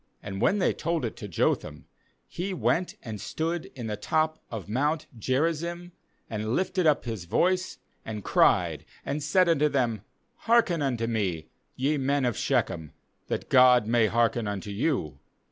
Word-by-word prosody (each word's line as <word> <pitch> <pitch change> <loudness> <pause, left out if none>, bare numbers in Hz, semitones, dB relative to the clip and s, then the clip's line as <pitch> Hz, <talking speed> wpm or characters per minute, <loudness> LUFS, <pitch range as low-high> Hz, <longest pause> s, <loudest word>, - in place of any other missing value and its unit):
7And 95 -1 -5
when 200 - +3
they 190 - +2
told 165 -4 -1
it 115 - -4
to 105 - -7
Jotham, 75 -4 -1 0.4
he 185 +2 -4
went 180 +1 0
and 110 -4 -6
stood 165 +8 -2
in 120 -4 -6
the 105 -1 -2
top 155 +7 0
of 110 -4 -6
mount 145 +8 0
Geri 135 +9 +1
zim, 170 +2 -6 0.4
and 110 +1 -2
lifted 185 -2 +1
up 150 -4 +3
his 110 -7 -4
voice, 185 - +1 0.3
and 105 -2 -6
cried, - - +3 0.2
and 140 +2 -2
said 180 +5 +3
unto 150 -3 +3
them: 120 -7 0 0.4
'Hearken' 225 -8 +2
unto 125 -5 0
me, 95 -9 -2 0.3
ye 145 +4 +1
men 140 0 +1
of 120 -3 0
Shechem, 80 -3 -1 0.3
that - - -3
God 125 -2 +6
may 115 0 +3
hearken 115 0 +1
unto 100 0 -4
you. 100 - -1
130 Hz, 160 wpm, -27 LUFS, 110-160 Hz, 0.4 s, God